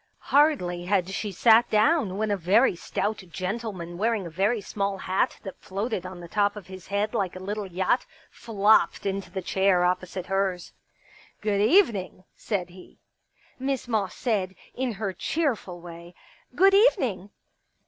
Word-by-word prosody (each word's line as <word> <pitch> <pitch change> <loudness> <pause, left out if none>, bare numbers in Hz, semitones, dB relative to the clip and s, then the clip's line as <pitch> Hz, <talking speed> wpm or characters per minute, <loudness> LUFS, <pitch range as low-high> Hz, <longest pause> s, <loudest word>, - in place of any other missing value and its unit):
Hardly 220 - +3
had 185 -1 +1
she 205 +2 -3
sat 225 +5 +5
down 215 - +2
when 215 0 -1
a - - +2
very 195 +5 +3
stout 210 +4 -2
gentleman 185 -2 -5
wearing 220 -2 0
a 170 - -7
very 200 +7 +1
small 200 -1 -3
hat 190 +6 -1
that 195 -3 -8
floated 195 -1 -3
on 185 -1 -9
the 170 - -9
top 205 +2 +1
of 210 -4 -9
his 185 -1 -11
head 205 +2 -1
like 195 -6 -1
a - - -7
little 205 +2 -4
yacht 190 +7 0 0.2
flopped 215 -2 +2
into 195 0 -3
the 190 -2 -5
chair 190 -1 +2
opposite 185 0 -2
hers. 190 -2 -2 0.7
Good 205 -1 0
evening! 215 - +2
'* - - -47
said 190 -5 -3
he. 180 +1 -15 0.6
Miss 265 -1 -2
Moss 215 -5 -1
said, 195 -6 -1 0.2
in 255 -2 -2
her 200 -2 -3
cheerful 220 - -2
way: 170 0 -11 0.2
" - - -29
Good 390 +2 +5
evening 265 - +3
200 Hz, 160 wpm, -26 LUFS, 185-220 Hz, 0.7 s, sat